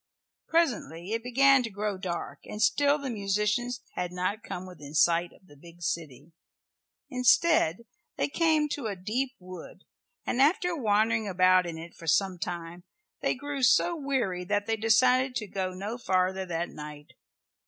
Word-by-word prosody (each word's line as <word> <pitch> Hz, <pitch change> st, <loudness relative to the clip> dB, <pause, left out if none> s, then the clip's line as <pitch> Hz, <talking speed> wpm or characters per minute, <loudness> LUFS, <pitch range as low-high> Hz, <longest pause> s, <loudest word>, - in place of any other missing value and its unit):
Presently 215 Hz, -, 0 dB
it 230 Hz, +1 st, -1 dB
began 270 Hz, +2 st, +4 dB
to 235 Hz, -, -4 dB
grow 205 Hz, 0 st, -3 dB
dark, 180 Hz, -3 st, -4 dB
and 210 Hz, -, -7 dB
still 285 Hz, +6 st, +3 dB
the 275 Hz, -3 st, -4 dB
musicians 210 Hz, +4 st, -1 dB
had 180 Hz, -1 st, -3 dB
not 185 Hz, +4 st, -2 dB
come 180 Hz, -4 st, -6 dB
within 155 Hz, -5 st, -10 dB
sight 170 Hz, +2 st, +3 dB
of -, -, -22 dB
the 145 Hz, -, -17 dB
big 170 Hz, +4 st, -14 dB
city. 155 Hz, -2 st, -4 dB, 0.8 s
Instead 250 Hz, -, +3 dB, 0.3 s
they -, -, +1 dB
came 310 Hz, 0 st, +2 dB
to 285 Hz, -5 st, -3 dB
a 205 Hz, -, -3 dB
deep 235 Hz, +8 st, -2 dB
wood, 185 Hz, 0 st, -11 dB, 0.4 s
and 250 Hz, -, 0 dB
after 345 Hz, +4 st, +3 dB
wandering 220 Hz, -3 st, +1 dB
about 185 Hz, -1 st, +4 dB
in 165 Hz, -1 st, -5 dB
it 165 Hz, +1 st, -9 dB
for 165 Hz, -, -12 dB
some 185 Hz, +2 st, +2 dB
time 170 Hz, +1 st, -5 dB, 0.4 s
they -, -, +1 dB
grew 285 Hz, +1 st, -5 dB
so 340 Hz, +6 st, +4 dB
weary 260 Hz, -, -1 dB
that 205 Hz, +2 st, -1 dB
they 225 Hz, -, 0 dB
decided 250 Hz, +4 st, +3 dB
to 215 Hz, -, -2 dB
go 190 Hz, -2 st, -3 dB
no 205 Hz, +6 st, -5 dB
farther 185 Hz, -2 st, 0 dB
that 170 Hz, 0 st, -2 dB
night. 150 Hz, -1 st, -10 dB
205 Hz, 165 wpm, -28 LUFS, 180-250 Hz, 0.8 s, began